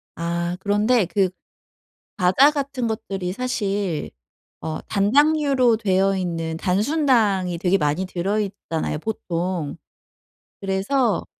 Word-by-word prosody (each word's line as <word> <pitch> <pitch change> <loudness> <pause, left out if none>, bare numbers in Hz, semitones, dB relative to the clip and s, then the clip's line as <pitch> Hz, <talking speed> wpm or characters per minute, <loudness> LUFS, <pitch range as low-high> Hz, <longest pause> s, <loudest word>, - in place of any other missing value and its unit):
아 170 +1 -2
그런데 210 +3 +2
그 185 +2 +1 0.9
과자 195 +10 +5
같은 275 -4 -2
것들이 195 -4 -3
사실 200 -8 -2 0.5
어 155 -1 -4
단당류로 265 +2 +3
되어있는 185 -5 0
단순당이 205 - +1
되게 185 +2 +2
많이 150 +3 0
들어 190 +3 -1
있잖아요, 190 -7 -3
보통. 175 -5 -3 0.8
그래서 200 +4 0
195 Hz, 220 characters per minute, -22 LUFS, 180-230 Hz, 0.9 s, 과자